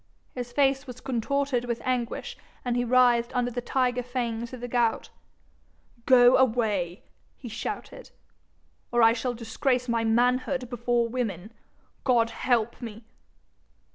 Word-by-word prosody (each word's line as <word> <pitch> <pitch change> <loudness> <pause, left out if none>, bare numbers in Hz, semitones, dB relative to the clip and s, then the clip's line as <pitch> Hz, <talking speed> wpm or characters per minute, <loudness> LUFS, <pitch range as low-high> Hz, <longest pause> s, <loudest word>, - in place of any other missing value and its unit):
His 245 -1 -6
face 270 +1 +1
was 250 -1 -8
contorted 260 +1 -1
with 235 -1 -2
anguish, 250 -2 -2 0.3
and 245 -1 0
he 245 - +1
writhed 245 0 +3
under 245 0 0
the 245 +1 -3
tiger 250 0 0
fangs 235 -2 -3
of 255 - -8
the 245 - -5
gout. 235 -2 0 1.0
'Go 250 -1 +7
away,' 215 -8 +1 0.3
he 255 - -9
shouted, 235 - -6 0.8
'or 240 -1 +3
I 225 0 +7
shall 245 +1 -2
disgrace 245 +2 -1
my 230 -1 0
manhood 250 +3 +1
before 240 0 0
women, 225 -4 -4 0.5
God 235 -3 +3
help 235 -1 0
me!' 225 -1 -8
245 Hz, 135 wpm, -27 LUFS, 230-255 Hz, 1.0 s, Go